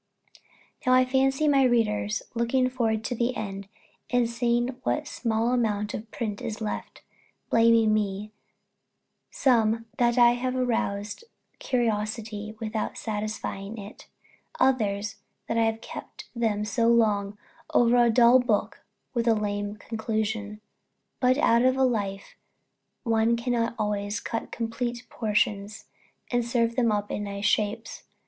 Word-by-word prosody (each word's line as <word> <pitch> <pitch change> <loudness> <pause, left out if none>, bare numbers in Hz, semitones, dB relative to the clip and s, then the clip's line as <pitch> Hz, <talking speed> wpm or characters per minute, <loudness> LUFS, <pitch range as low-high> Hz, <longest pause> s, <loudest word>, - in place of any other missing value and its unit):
Now 255 - +3
I 255 0 +5
fancy 270 +3 +2
my 280 -2 +4
readers, 225 -4 +1
looking 255 +2 +1
forward 225 -3 0
to 245 - -2
the 245 +1 -1
end, 195 -3 -5 0.4
and 245 -1 +2
seeing 235 +1 0
what 300 - 0
a - - -23
small 230 -3 -1
amount 210 -4 0
of 220 +1 -6
print 210 -4 -4
is 215 -1 -4
left, 215 -2 -5 0.5
blaming 230 -1 +5
me; 210 0 -1 1.0
some, 230 -3 +2
that 240 0 +3
I 240 -1 +7
have 255 +1 -2
roused 225 - -2 0.3
curiosity 215 -2 -2
without 220 -1 -3
satisfying 215 -1 -4
it; 205 0 -10 0.5
others, 210 -5 +1 0.3
that 230 - -1
I 225 - +4
have 225 0 -1
kept - - -9
them 215 -3 0
so 230 +1 +1
long 210 -3 +2 0.3
over 240 0 +4
a 240 -1 +5
dull 240 +2 +6
book 235 -4 -1 0.3
and 235 -2 -1
a 230 - +5
lame 205 -1 -2
conclusion. 220 -1 -3 0.6
But 255 +1 +3
out 235 -5 +4
of 255 +1 +3
a 265 - +3
life 200 -5 -2 0.7
one 225 0 +2
cannot 235 -1 -1
always 210 0 -1
cut 230 - -4
complete 235 +1 -3
portions, 210 -2 -1 0.5
and 245 -1 +2
serve 235 -1 0
them 240 -3 +2
up 205 -1 -1
in 205 - -3
nice 200 0 -4
shapes. 210 +2 0
225 Hz, 140 wpm, -26 LUFS, 210-240 Hz, 1.0 s, I